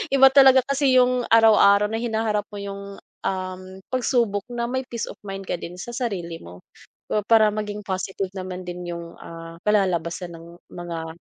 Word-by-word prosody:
iba 270 0 +7
talaga 265 -2 +7
kasi 275 -1 +2
yung 250 -1 +3
araw-araw 210 -2 +5
na 225 - -1
hinaharap 220 -3 -1
mo 205 - -12
yung 200 0 -7 0.3
um 185 -1 -3 0.3
pagsubok 235 -5 0
na 240 -1 -4
may 260 +1 -3
peace 235 -2 -4
of - - -15
mind 195 0 -5
ka 175 -2 -3
din 175 - -8
sa 190 +7 -7
sarili 195 -9 -4
mo 90 +1 -13 0.5
ah, 210 - +2
para 220 -2 +5
maging 210 0 -4
positive 190 0 -3
naman 185 -1 -6
din 175 0 -6
yung 170 0 -8
ah, 165 0 -10
kalalabasan 180 -4 0
ng 165 0 -11 0.2
mga. 170 -1 -6
200 Hz, 170 wpm, -23 LUFS, 180-235 Hz, 0.5 s, iba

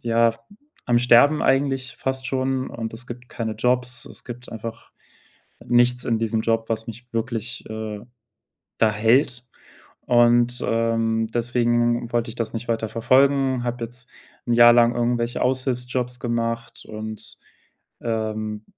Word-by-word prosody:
ja, 115 0 +3 0.5
am 120 -1 +3
Sterben 125 +5 +5
eigentlich 135 -1 +1
fast 130 0 -3
schon, 130 0 -1
und 115 -1 -5
es 120 +2 -9
gibt 125 +1 -9
keine 110 -2 -4
Jobs, 125 +2 +1
es - - -8
gibt 120 0 -9
einfach 115 +1 -8 0.7
nichts 120 +1 +3
in 115 -2 0
diesem 110 0 -1
Job, 115 0 0
was 110 0 -2
mich 120 +2 -9
wirklich, 115 +1 -3
äh, 110 -1 -5 0.8
da 110 -1 +3
hält. 120 +3 +2 0.6
Und, 120 0 +4
ähm, 115 -1 0
deswegen 120 0 +1
wollte 120 0 0
ich 115 - -9
das 115 -1 -4
nicht 115 +2 -5
weiterverfolgen, 130 +4 +2
habe 120 -1 -3
jetzt 125 +2 -9 0.4
'n 120 - +1
Jahr 120 0 +8
lang 120 0 +4
irgendwelche 120 0 -1
Aushilfsjobs 125 -1 -1
gemacht 115 0 -3
und, 110 0 -8 0.6
ähm, 110 -2 -3
120 Hz, 135 wpm, -23 LUFS, 115-125 Hz, 0.8 s, Jahr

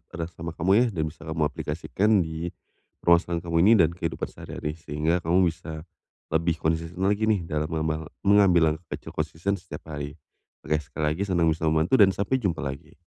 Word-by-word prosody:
eras 85 0 -4
sama 85 0 -5
kamu 85 +4 +1
ya 125 - +4
dan 85 -8 -2
bisa 80 +1 -7
kamu 80 0 -3
aplikasikan 80 +7 -1
di 80 +1 -4 0.6
ruasan 85 0 +3
kamu 85 -1 0
ini 100 +6 +6
dan 85 -6 +4
kehidupan 85 -1 -4
sehari-hari, 75 - -5
sehingga 80 +3 0
kamu 85 +1 +3
bisa 80 -2 -8 0.5
lebih 80 +1 +1
konsisten 80 +3 -2
lagi 105 +2 +2
nih 105 -5 +2
dalam 75 -2 -2
mema 80 -1 -2 0.2
mengambil 95 -6 +5
langkah 80 +2 -8
kecil - - -11
konsisten 85 +5 -2
setiap 85 -4 -9
hari. 75 -2 -6 0.5
Oke, 75 +1 +1
sekali 75 +1 -2
lagi 90 +6 -2
senang 85 -4 +2
bisa 80 0 -1
membantu 80 +10 +3
dan 95 -2 +6
sampai 115 +7 0
jumpa 95 -9 -1
lagi. 70 0 -7
80 Hz, 185 wpm, -26 LUFS, 80-90 Hz, 0.6 s, ini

